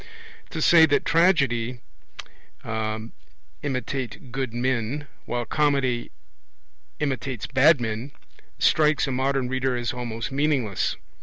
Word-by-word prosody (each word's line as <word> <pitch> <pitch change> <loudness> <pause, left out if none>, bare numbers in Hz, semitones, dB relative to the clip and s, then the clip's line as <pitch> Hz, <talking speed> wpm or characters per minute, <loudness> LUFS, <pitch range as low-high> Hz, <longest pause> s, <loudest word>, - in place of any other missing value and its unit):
To - - -3
say 165 -2 +7
that 145 - +1
tragedy 140 -9 +2 0.9
'imitates 110 - -5
good 130 -1 -2
men' 125 +3 -1 0.2
while 120 0 -2
comedy 135 -3 +1 0.9
'imitates 135 -4 -2
bad 140 +3 +5
men' 115 +3 -4 0.5
strikes 155 -1 +3
a 135 - -3
modern 130 0 0
reader 130 0 0
as 120 0 -2
almost 120 0 -4
meaningless. 135 -8 0
130 Hz, 100 wpm, -25 LUFS, 115-140 Hz, 0.9 s, say